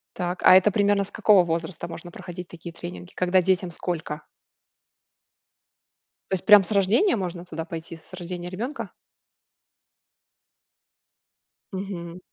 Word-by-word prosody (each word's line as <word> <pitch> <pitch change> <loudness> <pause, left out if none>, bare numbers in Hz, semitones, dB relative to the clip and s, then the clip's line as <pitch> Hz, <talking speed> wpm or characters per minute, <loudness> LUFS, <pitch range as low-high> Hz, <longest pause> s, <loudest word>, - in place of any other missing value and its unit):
Так, 180 0 -3
а 185 - +9
это 190 +2 +6
примерно 205 0 +2
с - - -10
какого 210 -4 +5
возраста 170 0 -3
можно 170 +1 -9
проходить 175 0 -8
такие 170 0 -9
тренинги? 90 - -9
Когда 185 +1 +3
детям 185 0 +1
сколько? 160 -3 -4 2.1
То 190 - +2
есть 180 - -6
прям 210 -2 +9
с 180 - -8
рождения 210 - +3
можно 180 -3 -4
туда 165 -1 -6
пойти, 165 0 -7
с 165 - -21
рождения 175 -1 -6
ребёнка? 230 +10 -5 2.8
Мгм. 180 -3 -6
180 Hz, 125 wpm, -25 LUFS, 170-195 Hz, 2.8 s, а